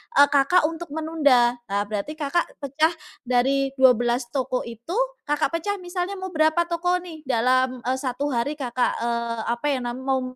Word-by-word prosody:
eee, 285 0 +7
Kakak 290 +5 +4
untuk 335 +1 -7
menunda 285 -7 +3
nah 200 +1 0
berarti 210 +9 -4
Kakak 310 +3 0 0.2
pecah 310 +5 +1 0.3
dari 270 +2 +1
12 245 -1 +4
toko 255 -1 -1
itu, 235 - -7 0.3
Kakak 295 +2 +1
pecah 405 +4 -2
misalnya 360 +1 -4
mau 375 -1 -6
berapa 315 +1 +3
toko 345 +1 0
nih 315 -5 -11
dalam, 255 +1 +1
eee, 255 +2 0
1 275 +2 -2
hari 250 +5 -1
Kakak, 250 -3 -1
eee, 235 -1 -2
apa 240 +5 -3
ya 265 -4 0
nam 240 +1 -4
mau 265 0 0
270 Hz, 170 wpm, -24 LUFS, 245-315 Hz, 0.3 s, eee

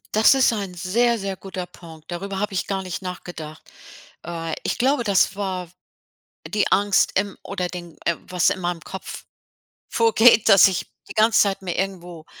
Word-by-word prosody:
Das 220 +4 +6
ist 265 -2 +4
ein 200 -5 -4
sehr, 230 +7 +1
sehr 195 -2 -4
guter 190 -2 -6
Punkt. 165 -2 -14
Darüber 195 +2 -4
habe 205 0 -2
ich 185 - -2
gar 195 -1 -2
nicht 185 0 -5
nachgedacht. 175 -4 -8 0.6
Äh, 165 -1 -4
ich - - -2
glaube, 260 0 +2
das 195 -3 +2
war 185 -3 -4 0.8
die 210 -1 0
Angst 200 0 +3
im 200 0 -2
oder 185 -2 -3
den 175 -2 -9 0.3
was 180 -1 +2
in - - -3
meinem 175 -1 -2
Kopf 190 - -8 0.7
vorgeht, 230 0 +5
dass 200 -2 +8
ich 190 -2 -2 0.2
die - - -7
ganze 220 +1 +4
Zeit 200 -1 0
mir 180 -2 -3
irgendwo 180 -4 -4
190 Hz, 170 wpm, -22 LUFS, 175-205 Hz, 0.8 s, dass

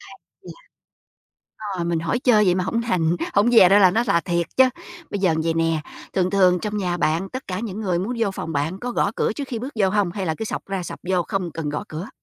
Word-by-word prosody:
chà. - - -14 1.6
Ờ, 170 - -2
mình 170 -1 0
hỏi 165 +9 -1
chơi 230 -5 +4
vậy 180 -2 +3
mà 185 0 -1
hổng 230 +5 -1
thành, 175 -8 +1 0.2
hổng 205 +4 +4
dè 225 -7 +7
ra 200 +2 +6
là 185 -3 +6
nó 225 +5 +1
rà 200 -7 +2
thiệt 170 -1 -1
chớ. 260 - +7 0.5
Bây 205 - -3
giờ 180 -5 +3
vậy 165 0 0
nè, 165 -1 +1 0.3
thường 185 -1 +1
thường 185 -2 +4
trong 210 -1 -3
nhà 180 -3 -1
bạn, 170 +3 0
tất 260 +1 -7
cả 185 0 -3
những 220 -2 -5
người 180 -5 0
muốn 215 +7 -2
vô 220 -4 +1
phòng 165 -3 -5
bạn 155 +6 -2
có 245 - -3
gõ 200 - +1
cửa - - +1
trước 285 +5 -5
khi 235 - -3
bước 255 +5 -6
vô 190 - +4
hông 205 -3 +1
hay 195 -2 -4
là 160 - 0
cứ 220 - -3
xộc - - -4
ra 195 -2 -3
xộc - - -7
vô 180 -2 +2
không 190 -2 -3
cần 160 -3 -4
gõ 150 - -3
cửa? 160 +7 -6
185 Hz, 260 wpm, -22 LUFS, 170-210 Hz, 1.6 s, dè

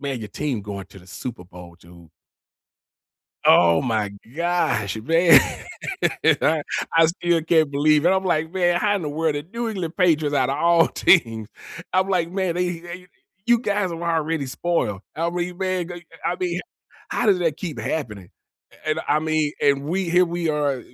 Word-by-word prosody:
man, 135 -4 -4
your 105 - -7
team 130 -1 -3
going 100 -2 -7
to 95 - -15
the 90 - -19
Super 110 +1 -7
Bowl, 90 -1 -13
dude. 85 -1 -17 1.4
Oh 85 -1 +5
my 110 -4 -1 0.2
gosh, 165 - 0
man, 165 +5 +6 1.0
I 155 -1 +2 0.3
I 165 -1 +7
still 170 -1 0
can't 160 -3 +2
believe 150 +2 +3
it. - - +6
I'm 190 0 +1
like, 160 -3 0
"Man, 175 -2 +2
how 205 -1 +2
in 190 - -4
the 150 - -3
world 160 0 0
the 145 0 -4
New 235 0 -3
England 185 -6 -4
Patriots, 160 -6 +2
out 130 -3 +2
of 135 - -1
all 170 +1 +4
teams" 115 - +2 0.4
I'm 185 +1 +2
like, 175 -3 0
"Man, 185 -2 -1
eh, - - -1
you 175 -1 -3
eh, - - -7
you 180 0 -12 0.4
you 240 0 +5
guys 205 -4 0
are - - -3
the 170 - -5
ones 170 0 -2
already 160 -2 -1
spoiled." 130 - -2
I 165 +1 -1
re 175 +1 -3
man, 185 -1 -3
I 175 0 -9 0.3
I - - -5
mean 180 -1 -1 0.5
how - - -1
does 195 -3 +4
that 165 -4 0
keep 170 -6 -5
happening? 105 - -4 0.6
A - - -2
and 155 - 0
I 150 - +3
mean, 155 -1 0
and 140 -1 +2
we 175 +3 -2
here 180 +2 +4
we 170 -1 -3
are, 145 -4 0
160 Hz, 195 wpm, -22 LUFS, 140-175 Hz, 1.4 s, I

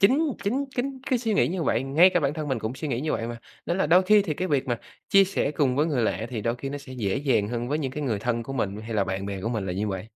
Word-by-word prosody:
chính 280 +9 +4
chính 255 +8 0
chính 265 +2 -2
cái 255 - +3
suy 225 -3 -1
nghĩ - - +3
như 175 -1 -2
vậy - - +1
ngay 155 +8 +5
cả 175 - +2
bản 140 0 0
thân 155 -2 -4
mình 130 - 0
cũng 110 +3 -4
suy 155 +3 -4
nghĩ 120 -3 -1
như 155 +2 -1
vậy 115 - -2
mà 120 0 -6 0.3
nên 175 - 0
là 190 - +2
đôi 175 +4 +6
thi 210 0 +6
thì 160 -6 -2
cái 185 +4 -2
việc 140 -2 +1
mà 120 -2 -1 0.3
chia 195 0 +6
sẻ 185 -7 -1
cùng 140 -4 +1
với 150 +3 +3
người 140 -7 0
lạ 110 0 -1
thì 115 -3 -3
đôi 115 +3 0
khi 135 +2 -5
nó 145 +1 -4
sẽ 140 -2 -11
dễ 105 -7 -1
dàng 130 -7 +1
hơn 120 0 -3
với 150 +3 0
những 135 -4 -2
cái 150 +3 -5
người 115 -7 0
thân 115 +2 -1
của 135 - -7
mình 105 -5 -2
hay 110 +1 -6
là 100 -2 +2
bạn 95 +1 -3
bè 100 -1 -4
của 110 - -2
mình 110 -5 -2
là 90 - -2
như 105 +3 -1
vậy. 95 0 -4
135 Hz, 335 wpm, -26 LUFS, 115-170 Hz, 0.3 s, đôi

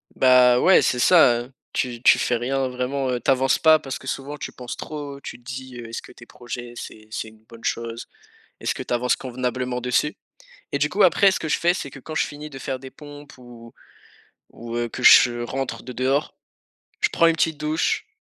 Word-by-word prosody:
Bah, 125 -1 +5
ouais 190 - +6
c'est 125 - +1
ça, 125 -7 +5
heu, 125 +3 -11 0.2
tu 120 -2 -2
tu - - +6
fais 120 - +1
rien 130 +2 -1
vraiment, 130 +1 -2
heu, 125 - -1
tu 120 - -3
avances 135 0 +3
pas 160 -1 +6
parce 135 - -6
que 130 - -12
souvent 145 +3 -4
tu - - -7
penses 125 -1 -7
trop, 145 -2 -7
tu - - -8
te 120 - -25
dis: 130 0 -8
«Heu, 115 -1 -8
est-ce 115 - -5
que - - -14
tes 115 - -15
projets 120 0 -8
c'est 110 0 -9
c'est 110 - -4
une 110 0 -17
bonne 115 0 -13
chose? 115 0 -3 0.5
Est-ce - - -1
que - - -6
tu - - -6
avances 125 +1 +1
convenablement 125 0 -3
dessus?» 125 +4 0 0.6
Et - - 0
du - - +1
coup - - +2
après 200 -2 +5
ce - - -2
que 160 - -4
je - - +1
fais, 175 +1 +2
c'est 145 - -5
que 135 - -12
quand 155 +4 -9
je - - +2
finis 150 +1 -9
de 135 -1 -10
faire 130 0 -4
des 130 0 -11
pompes 145 -2 -13
ou 120 -2 -14 0.8
ou, 115 0 -9
heu, 120 0 -1
que - - -7
je 120 -1 +7
rentre 135 +2 -4
de 125 - -8
dehors, 135 +4 0 0.7
je - - +3
prends 165 - +4
une 165 - +3
petite 160 -2 0
douche 155 - -1
130 Hz, 225 wpm, -23 LUFS, 120-140 Hz, 0.8 s, je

